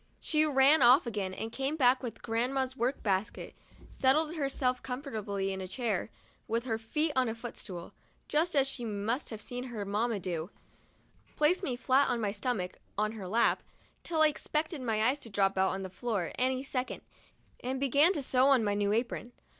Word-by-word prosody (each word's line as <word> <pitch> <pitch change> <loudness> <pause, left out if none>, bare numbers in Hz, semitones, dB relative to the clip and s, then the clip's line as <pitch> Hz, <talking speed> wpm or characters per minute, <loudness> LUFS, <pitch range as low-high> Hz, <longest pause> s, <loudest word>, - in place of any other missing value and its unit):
She 310 -1 +2
ran 280 +2 +5
off 250 +3 +7
again, 205 -5 -3
and 220 +4 -5
came 270 +5 -2
back 255 -3 +4
with 235 -4 -7
grandma's 255 +3 -1
work 255 +2 -1
basket, 195 +1 -1 0.4
settled 300 +4 +2
herself 275 -4 0
comfortably 215 -7 -3
in 190 - -5
a 185 - -5
chair, 220 -1 -2 0.4
with 230 +2 -1
her 225 -3 -1
feet 300 +8 0
on 255 -2 +2
a 225 - -3
footstool, 210 -7 -7 0.3
just 320 +2 +1
as 275 -1 +5
she 265 -2 -3
must 225 +5 -2
have 220 - -6
seen 245 +3 -5
her 225 -5 -5
mamma 210 +2 0
do; 170 -2 -3 0.9
placed 335 +5 +3
me 265 -10 -2
flat 260 +3 +3
on 245 -2 0
my 210 -3 0
stomach 205 -4 -3 0.2
on 215 +1 +1
her 210 -4 -7
lap, 225 +5 +2 0.4
till 320 -2 +2
I - - +8
expected 305 +1 -2
my 220 -3 0
eyes 260 +5 +2
to 230 - -7
drop 195 -1 +1
out 190 0 +3
on 195 +1 -3
the - - -4
floor 190 -2 -3
any 260 +1 0
second, 260 -2 -3 0.6
and 260 +2 -2
began 280 +5 +4
to 295 - -3
sew 255 +1 +3
on 270 -4 +5
my 205 -1 +1
new 205 0 +1
apron. 240 +1 -2
245 Hz, 190 wpm, -31 LUFS, 210-270 Hz, 0.9 s, I